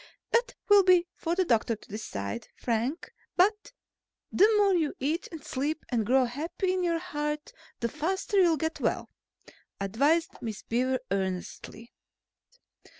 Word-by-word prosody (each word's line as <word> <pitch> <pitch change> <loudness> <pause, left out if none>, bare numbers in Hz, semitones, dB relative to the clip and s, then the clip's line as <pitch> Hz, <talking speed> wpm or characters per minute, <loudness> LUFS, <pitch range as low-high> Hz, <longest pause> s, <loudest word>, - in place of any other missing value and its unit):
"That 480 +1 +1
will 410 -2 +8
be 360 -2 +5
for 335 +1 -2
the 375 0 +2
doctor 230 -4 +2
to 215 - -18
decide, 100 - -5
Frank. 245 +7 -2 0.2
But 420 +6 +2 0.6
the 420 +4 +5
more 400 -2 +4
you 320 -5 +1
eat 305 +6 -1
and 320 -4 -9
sleep 295 +4 -2
and 225 -4 0
grow 260 +1 +4
happy 325 - -2
in 370 - 0
your 340 -1 +1
heart, 300 0 -4 0.3
the 235 - +1
faster 380 - 0
you'll 335 -3 +4
get 320 +3 -2
well," - - -1 0.7
advised 280 - +1
Miss 220 -3 -5
Beaver 255 +3 +1
earnestly. 195 +4 -4
300 Hz, 145 wpm, -28 LUFS, 235-360 Hz, 0.7 s, will